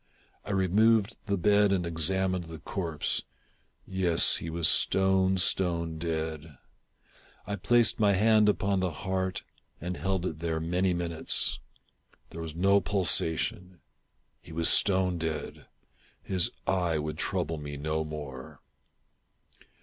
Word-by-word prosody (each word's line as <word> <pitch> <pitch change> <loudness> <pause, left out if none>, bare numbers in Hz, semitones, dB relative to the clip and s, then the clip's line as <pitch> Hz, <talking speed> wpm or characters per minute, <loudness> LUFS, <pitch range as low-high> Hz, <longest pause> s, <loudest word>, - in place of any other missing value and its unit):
I - - -11
removed 105 +3 +2
the 100 -1 0
bed 100 +2 +3
and 90 -3 0
examined 90 +2 0
the 80 0 -9
corpse. 80 -4 -3 0.6
Yes, 90 -3 +3
he 85 - -5
was 80 0 +1
stone, 95 +2 +3
stone 85 -3 0
dead. 80 -3 -4 0.9
I 100 - -3
placed 115 +4 +2
my 105 -2 +4
hand 105 +1 +4
upon 100 -1 0
the 90 -1 0
heart 95 +2 -3 0.4
and 90 +2 -4
held 95 -1 -2
it 80 -3 -4
there 80 -1 -2
many 90 +3 0
minutes. 85 -2 0 0.7
There 85 - -7
was 80 -1 -7
no 100 +3 +3
pulsation. 90 -1 0 0.6
He - - -15
was 80 +1 0
stone 95 -3 +2
dead. 80 -1 -5 0.6
His 95 -2 +1 0.2
eye 90 -4 0
would 75 +1 -4
trouble 85 -4 -2
me 75 -1 -7
no 80 +2 -2
more. 75 -4 -8
90 Hz, 125 wpm, -28 LUFS, 80-95 Hz, 0.9 s, my